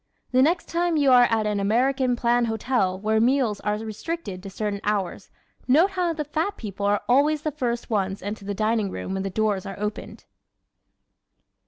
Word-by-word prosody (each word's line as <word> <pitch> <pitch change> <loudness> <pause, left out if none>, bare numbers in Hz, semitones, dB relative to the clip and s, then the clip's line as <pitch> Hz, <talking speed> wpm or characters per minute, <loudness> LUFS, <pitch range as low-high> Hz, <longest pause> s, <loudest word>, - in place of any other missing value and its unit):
The 255 0 +4
next 330 +5 +2
time 345 -1 0
you 280 -3 +4
are 245 -1 +7
at 225 -1 +1
an 210 -1 0
American 250 +5 +2
plan 240 0 +2
hotel 220 -4 0
where 220 +2 +1
meals 245 -4 +2
are 210 0 -1
restricted 220 - -5
to 195 - -8
certain 200 +1 -3
hours 200 -4 -2 0.4
note 320 +10 +4
how 360 -3 0
the 305 -2 -3
fat 325 +8 -2
people 200 -2 -4
are 205 0 +2
always 290 +4 +3
the 310 - -1
first 240 -3 -3
ones 195 -2 -1
into 205 +1 -5
the 200 0 -4
dining 215 0 0
room 190 - -5
when 190 - -2
the 195 - -3
doors 205 -1 0
are 195 -2 -7
opened! 210 0 -5
225 Hz, 185 wpm, -24 LUFS, 205-270 Hz, 0.4 s, are